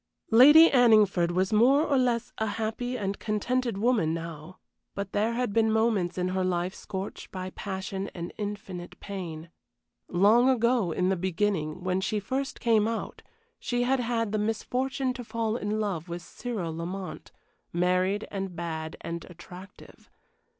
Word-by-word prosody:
Lady 295 +8 +9
Anningford 215 -8 +5
was 185 +3 0
more 260 +7 +5
or 285 - +1
less 245 -3 +1
a 220 - 0
happy 225 +4 -3
and 200 -2 -3
contented 230 +1 -1
woman 205 -8 +2
now, 165 +1 -8 0.4
but 200 -1 -4
there 220 +3 +1
had 245 -3 -1
been 220 0 +3
moments 220 -6 +1
in 180 0 0
her 185 0 0
life 180 0 -1
scorched 195 -1 -6
by 185 0 -6
passion 190 0 -5
and 170 -1 -6
infinite 200 -4 -6
pain. 170 -5 -7 0.6
Long 215 +8 +4
ago 235 -6 +2
in 180 +3 +1
the 190 - +2
beginning 180 -3 -1
when 185 0 0
she 210 +2 -1
first 265 +7 -3
came 220 -3 +3
out 230 0 -4 0.4
she 245 0 -1
had 265 +2 +2
had 230 -3 -1
the 215 - 0
misfortune 255 +5 -1
to 245 - -7
fall 225 -1 -2
in 215 -2 -2
love 185 -6 -3
with 175 +1 -5
Cyril 185 -8 -5
Lamont, 180 +3 -6 0.4
married 185 +3 +1
and 195 -2 -4
bad 160 -1 -5
and 170 0 -5
attractive. 180 +2 -13
200 Hz, 155 wpm, -28 LUFS, 180-230 Hz, 0.6 s, Lady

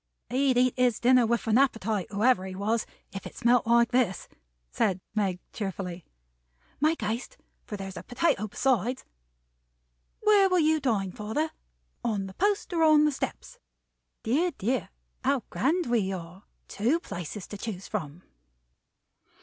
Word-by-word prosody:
"He'd 260 0 +2
eat 250 0 +4
his 250 -3 +2
dinner 250 -1 +5
with 235 +1 0
an 225 +2 +4
appetite, 220 -7 +1
whoever 210 0 +3
he 185 - -7
was, 215 +4 -1 0.3
if 195 - -6
it - - -13
smelt 240 0 +3
like 235 0 +4
this," 240 -7 +1 0.4
said 185 - +1
Meg, 195 -4 0
cheerfully. 185 -4 -4 0.8
"Make 310 +1 +2
haste, 230 - -3 0.3
for 210 - -5
there's 195 -1 -7
a - - -5
potato 245 - 0
besides. 250 +2 0 1.2
Where 415 -3 +5
will 365 - +3
you 315 -1 +3
dine, 215 -9 0
father? 220 - -2 0.5
On 210 -4 -1
the 190 - -8
Post, 405 - 0
or 330 - +1
on 310 -1 +6
the 300 - +3
Steps? 270 - -5 0.6
Dear, 295 +11 +2
dear, 245 +6 -1 0.3
how 270 -2 +1
grand 335 +7 +1
we 225 -5 +1
are. 180 +1 -8 0.2
Two 245 +11 +1
places 180 - -6
to 205 - -8
choose 195 -4 -5
from!" 155 +3 -5
235 Hz, 150 wpm, -28 LUFS, 195-275 Hz, 1.2 s, on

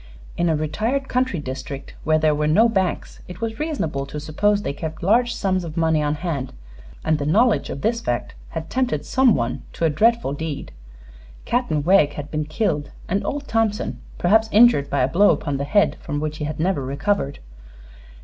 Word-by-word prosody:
In 175 0 +1
a 160 - +2
retired 220 - -1
country 255 -6 0
district, 135 0 -6
where 155 0 +3
there 155 -1 +3
were 150 0 0
no 210 +10 +5
banks, 190 -5 -2
it 180 -1 -9
was 225 +1 -4
reasonable 165 - -2
to 150 - -6
suppose 205 +8 +1
they 140 - -2
kept 160 +2 -6
large 235 +5 +3
sums 185 -2 0
of 165 0 -7
money 160 -2 +2
on 150 0 0
hand, 150 -5 -4 0.5
and 155 -1 +2
the 145 - -2
knowledge 220 +8 +3
of 140 - -5
this 230 +1 0
fact 120 - -2 0.2
had 160 0 -5
tempted 255 +6 -1
some 260 -4 +4
one 120 0 -2
to 165 - -1
a 160 - +3
dreadful 230 -1 +2
deed. 150 -1 -5 0.7
Captain 200 - 0
Wegg 170 -4 +4
had 145 0 -7
been 155 -1 -1
killed 155 -3 -1 0.2
and 195 +3 0
old 285 0 -3
Thompson 225 -2 0 0.2
perhaps 220 +5 +3
injured 215 -11 +5
by 140 - +1
a - - +3
blow 185 +9 +4
upon 145 -3 0
the 140 - -2
head 200 +8 +2
from 145 - -3
which 155 0 -3
he 150 - -3
had 155 +1 -5
never 170 -4 0
recovered. 140 +3 -1
160 Hz, 195 wpm, -22 LUFS, 150-220 Hz, 0.7 s, no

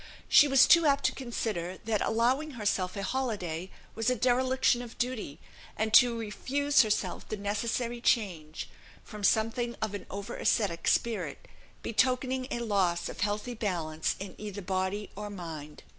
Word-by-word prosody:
She 290 - +7
was 270 -1 +6
too 335 -2 +6
apt 280 0 +3
to - - +3
consider, 210 -8 -4
that 220 -2 0
allowing 255 +5 +1
herself 200 -3 -1
a 200 - -3
holiday 190 -8 -2 0.2
was 225 +2 0
a 250 - +2
dereliction 255 +1 +2
of 240 -2 -10
duty, 240 - -3 0.4
and 220 0 -1
to 240 -1 +7
refuse 280 +6 +1
herself 215 -3 -1
the 215 - -3
necessary 230 +4 -2
change, 175 -11 0 0.4
from 210 -2 -10
something 230 +3 +1
of 220 -2 -2
an 205 - -6
over 200 +1 -6
ascetic 180 -7 0
spirit, 235 -2 0 0.4
betokening 255 +3 +1
a 240 - -3
loss 190 -6 +1
of - - -9
healthy 210 +4 -1
balance 170 -8 -2
in 190 -1 -7
either 205 -2 -6
body 190 +2 -2
or 210 +1 -6
mind. 160 -6 -8
215 Hz, 155 wpm, -29 LUFS, 195-245 Hz, 0.4 s, She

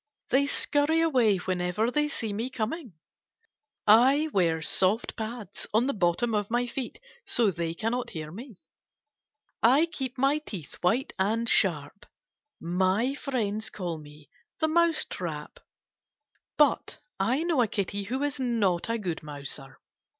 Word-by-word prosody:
They 280 +2 +4
scurry 290 +3 +2
away 250 -11 +3
whenever 185 +5 -1
they 295 +3 +1
see 225 -8 -3
me 230 +5 -2
coming. 250 - -4 0.9
I 265 +8 +5
wear 165 -4 +2
soft 195 +7 +3
pads 220 -3 -6
on 230 +3 +4
the 280 - 0
bottom 195 +5 +1
of 205 -1 0
my 240 +1 +1
feet 245 +1 -5 0.2
so 225 -4 +2
they 165 -1 -3
cannot 240 +4 -2
hear 155 -2 -6
me. 220 - -11 1.0
I 265 +8 +5
keep 270 -6 -5
my 275 +4 +2
teeth 195 - -9
white 230 +10 +1
and 225 +4 +1
sharp. 170 -4 +1 0.5
My 190 +9 +1
friends 220 -7 -2
call 175 -5 -4
me 150 -1 -14 0.2
* - - -57
the 315 - +2
Mouse 335 0 +2
Trap.' - - -6 1.0
But 295 -1 +2 0.2
I 265 +7 +1
know 335 -6 +2
a 230 - +3
Kitty 200 0 -2
who 260 +7 -2
is 290 -1 -2
not 225 -8 +1
a 230 - +1
good 180 -7 -4
mouser. 145 -2 -5
225 Hz, 145 wpm, -28 LUFS, 185-265 Hz, 1.0 s, I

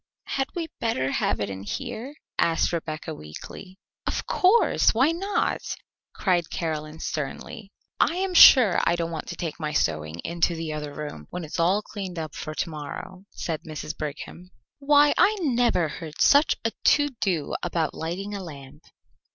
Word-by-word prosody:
"Had 270 0 0
we 340 -2 -2
better 135 - 0
have - - 0
it 105 - -1
in 95 -1 -6
here?" 245 - -5 0.2
asked 165 +1 +2
Rebecca 160 -1 -4
weakly. 155 - -10 0.3
"Of - - -2
course! 380 - +4
Why 265 +7 +4
not?" 390 +5 -1 0.5
cried 175 -4 +1
Caroline 155 -2 -4
sternly. 195 - -5 0.3
"I 335 - +3
am 375 0 -1
sure 250 - +8
I - - +3
don't 170 -1 -2
want 160 -2 -5
to - - -5
take 165 -2 -5
my 155 -1 -3
sewing 80 - 0
into 170 0 +1
the 160 -1 -4
other 150 -1 -5
room, 145 - -7
when 180 - -5
it 155 - -9
is - - -3
all 185 +5 +3
cleaned 190 -5 -6
up 155 -2 -4
for 155 +1 -6
to - - -2
morrow," 155 +5 -7
said 160 -3 -4
Mrs. 155 -1 -6
Brigham. 155 +4 -7 0.3
"Why, 290 +1 +5
I 430 +2 +5
never 240 - +2
heard 155 0 -8
such 285 +2 +5
a 225 - +2
to 290 -1 +4
do 170 -7 0
about 170 -3 -1
lighting 185 +6 -4
a 200 - -4
lamp." 145 -3 -11
170 Hz, 170 wpm, -25 LUFS, 155-230 Hz, 0.5 s, sure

